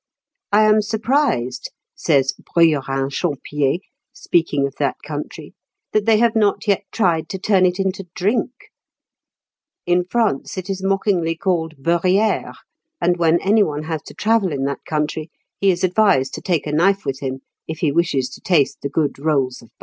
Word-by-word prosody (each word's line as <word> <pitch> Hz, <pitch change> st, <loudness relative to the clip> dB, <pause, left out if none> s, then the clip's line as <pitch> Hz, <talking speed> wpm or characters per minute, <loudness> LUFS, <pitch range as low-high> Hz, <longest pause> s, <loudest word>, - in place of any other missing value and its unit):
"I 210 Hz, +1 st, +5 dB
am 215 Hz, 0 st, +5 dB
surprised," 220 Hz, -, 0 dB, 0.2 s
says 135 Hz, -1 st, +1 dB
Bruyérin 140 Hz, -5 st, +1 dB
Champier, 145 Hz, -2 st, -1 dB, 0.3 s
speaking 155 Hz, -5 st, 0 dB
of 140 Hz, -, -4 dB
that 140 Hz, -2 st, 0 dB
country, 150 Hz, 0 st, -7 dB, 0.4 s
"that 215 Hz, 0 st, 0 dB
they 220 Hz, -1 st, +5 dB
have 230 Hz, 0 st, +2 dB
not 215 Hz, 0 st, +1 dB
yet 200 Hz, 0 st, +1 dB
tried 165 Hz, -7 st, +1 dB
to 190 Hz, -, -4 dB
turn 190 Hz, -1 st, +3 dB
it 180 Hz, +2 st, -2 dB
into 195 Hz, -1 st, -2 dB
drink; 210 Hz, +6 st, 0 dB, 1.4 s
in 175 Hz, 0 st, +2 dB
France 200 Hz, -, -1 dB
it 185 Hz, +1 st, -4 dB
is 190 Hz, -1 st, -4 dB
mockingly 195 Hz, -4 st, 0 dB
called 165 Hz, -2 st, -1 dB
beurrière; 180 Hz, +8 st, +1 dB, 0.4 s
and 175 Hz, +1 st, +1 dB
when 170 Hz, 0 st, +3 dB
any 210 Hz, +3 st, +3 dB
one 150 Hz, -5 st, -1 dB
has 160 Hz, -1 st, -4 dB
to -, -, -11 dB
travel 220 Hz, -4 st, +1 dB
in 135 Hz, -2 st, -2 dB
that 140 Hz, -1 st, -3 dB
country, 155 Hz, +1 st, -2 dB, 0.3 s
he 200 Hz, -, +3 dB
is 180 Hz, -1 st, 0 dB
advised 185 Hz, -8 st, +3 dB
to -, -, -6 dB
take 170 Hz, -5 st, 0 dB
a 150 Hz, -, -3 dB
knife 190 Hz, +5 st, +2 dB
with 135 Hz, -1 st, -3 dB
him 135 Hz, -1 st, -4 dB, 0.3 s
if 160 Hz, -, -5 dB
he 155 Hz, -, +2 dB
wishes 145 Hz, -5 st, +1 dB
to -, -, -12 dB
taste 160 Hz, -7 st, +1 dB
the 140 Hz, -, -3 dB
good 145 Hz, -1 st, -1 dB
rolls 140 Hz, -4 st, 0 dB
of 115 Hz, -, -16 dB
butter." -, -, -37 dB
170 Hz, 175 wpm, -20 LUFS, 145-195 Hz, 1.4 s, I